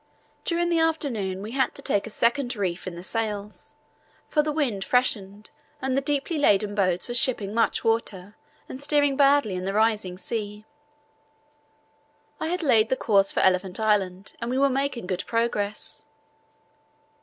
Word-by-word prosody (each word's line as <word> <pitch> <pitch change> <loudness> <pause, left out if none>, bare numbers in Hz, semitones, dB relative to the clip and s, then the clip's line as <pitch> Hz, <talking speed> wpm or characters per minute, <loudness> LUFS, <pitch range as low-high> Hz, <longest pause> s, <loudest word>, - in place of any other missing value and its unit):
During 345 0 0
the 335 -1 +2
afternoon 235 -13 -1
we 215 - -6
had 265 +1 0
to - - -9
take 205 +2 0
a - - -6
second 240 +3 0
reef 190 -3 -3
in 180 - -5
the 175 - -8
sails, 210 +3 -4 0.5
for 300 - +3
the 300 0 -2
wind 260 -11 -1
freshened 210 -5 0 0.3
and 260 0 -1
the 275 - +2
deeply 290 +3 -1
laden 205 -6 +3
boats 185 -3 0
were 240 - -4
shipping 235 -5 +1
much 230 0 +1
water 210 -4 -1 0.3
and 260 - -8
steering 290 -1 +2
badly 280 -6 +4
in 185 0 -4
the 195 - -2
rising 215 -4 +1
sea. 210 0 -5 1.7
I 315 - -2
had 355 +1 -2
laid 230 -6 +4
the 260 - +1
course 200 -3 +3
for - - 0
Elephant 185 +1 +2
Island 200 -3 0
and 235 - -3
we 255 - -1
were 280 +1 +4
making 270 -4 -1
good 180 0 -2
progress. 220 -3 -2
225 Hz, 165 wpm, -25 LUFS, 200-270 Hz, 1.7 s, badly